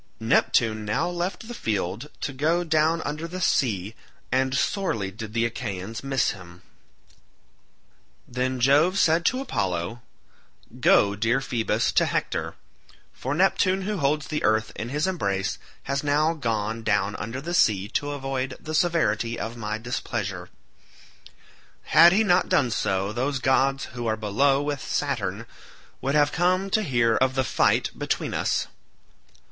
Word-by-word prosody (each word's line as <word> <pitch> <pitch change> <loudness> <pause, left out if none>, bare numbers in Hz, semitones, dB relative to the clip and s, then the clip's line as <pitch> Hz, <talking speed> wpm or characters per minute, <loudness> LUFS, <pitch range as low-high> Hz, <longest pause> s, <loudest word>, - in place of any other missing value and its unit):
Neptune 110 -1 +2
now 110 +11 0
left 180 +6 -4
the 240 - -6
field 105 - -3
to 135 - -3
go 160 +6 +1
down 160 0 +1
under 155 +3 -4
the 180 +2 -6
sea, 110 - 0 0.4
and 130 +1 +1
sorely 115 - -1
did 110 +2 -8
the 115 0 +2
Achaeans 110 -2 -5
miss 135 -2 +1
him. 90 -2 -12 1.6
Then 130 +1 -2
Jove 145 +9 +4
said 165 -2 +3
to 260 +1 +1
Apollo, 100 - -2 0.8
"Go, 100 0 +4
dear 115 +5 +1
Phoebus, 120 -4 0
to - - +3
Hector, - - -2 0.6
for 135 +3 -3
Neptune 190 +1 +2
who 210 +1 -2
holds 150 0 0
the 150 - -3
earth 110 0 +2
in 110 - -5
his 150 +3 0
embrace 100 - -1 0.2
has 140 +1 -2
now 150 +3 +2
gone 115 -6 -2
down 105 -2 0
under 115 +4 -5
the 170 +5 -5
sea 100 - +3
to 145 +4 -2
avoid 135 -2 -3
the 155 - -7
severity 120 -9 +1
of 115 +1 -4
my 110 -2 -3
displeasure. 105 -6 -4 1.3
Had 170 +2 +7
he 210 +4 +3
not 180 -3 +3
done 125 -4 +2
so 100 -1 -1
those 135 +4 -1
gods 135 +1 +1
who 120 -1 -4
are 110 0 0
below 135 +7 +2
with 145 -2 -3
Saturn 115 -7 -2 0.6
would 140 +2 -1
have 145 -1 +4
come 185 +3 +1
to 215 - +3
hear 120 - +2
of 130 0 +1
the 130 - +2
fight - - +2
between - - -2
us. - - 0
130 Hz, 150 wpm, -25 LUFS, 110-155 Hz, 1.6 s, Had